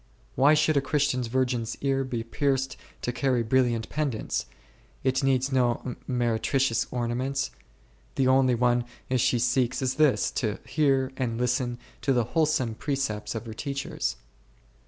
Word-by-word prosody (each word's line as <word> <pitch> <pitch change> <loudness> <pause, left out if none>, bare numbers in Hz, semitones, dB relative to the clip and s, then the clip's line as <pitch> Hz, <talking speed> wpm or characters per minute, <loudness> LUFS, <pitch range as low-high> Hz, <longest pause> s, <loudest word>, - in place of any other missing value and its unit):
Why 145 +4 +5
should 155 0 +3
a - - +4
Christian 140 -2 +1
virgin's 120 -1 -1
ear 135 -1 +1
be 125 -3 -3
pierced 135 +2 0 0.3
to 120 - 0
carry 125 -1 +1
brilliant 120 -1 +1
pendants; 140 - -2 0.6
it 130 +1 +1
needs 135 0 +2
no 125 -1 +1
meretricious 120 0 +1
ornaments, 125 +3 -1 0.6
the 130 - +2
only 130 -1 +4
one 120 0 +2 0.3
she 120 0 +2
seeks 120 +1 +1
is 130 -1 0
this, 150 -4 +3
to 110 -4 -1
hear 135 -3 +2
and 120 -3 -1
listen 125 0 0 0.2
to 135 - +2
the 120 -2 +2
wholesome 150 -8 +2
pre 140 +5 -2
cepts 110 -6 -3
of 115 - -4
her 110 - -6
teachers. 140 +4 -3
130 Hz, 145 wpm, -27 LUFS, 120-135 Hz, 0.6 s, Why